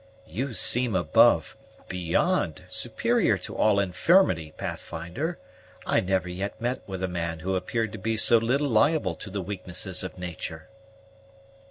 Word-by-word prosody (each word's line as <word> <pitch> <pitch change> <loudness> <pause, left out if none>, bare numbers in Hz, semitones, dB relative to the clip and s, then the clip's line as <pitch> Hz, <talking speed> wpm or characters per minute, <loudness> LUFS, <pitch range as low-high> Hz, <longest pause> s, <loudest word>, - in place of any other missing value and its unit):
"You 130 +4 -4
seem 115 +3 +2
above, 90 - +4 0.3
beyond, 90 -2 0
superior - - +1
to - - -8
all 105 -2 +3
infirmity, 90 - +3
Pathfinder; 90 - -4 0.5
I - - +3
never 95 -1 0
yet 95 +3 -4
met 120 +2 -2
with 95 -2 -5
a - - +1
man 85 -2 -3
who 95 +3 -1
appeared 110 +3 -1
to 110 - -7
be 110 +4 -1
so 115 +1 +5
little 135 +6 +1
liable 115 - +3
to 90 +5 -9
the 95 0 -4
weaknesses 90 -1 -3
of 95 - -7
nature." 85 -1 -6
95 Hz, 145 wpm, -26 LUFS, 90-115 Hz, 0.5 s, so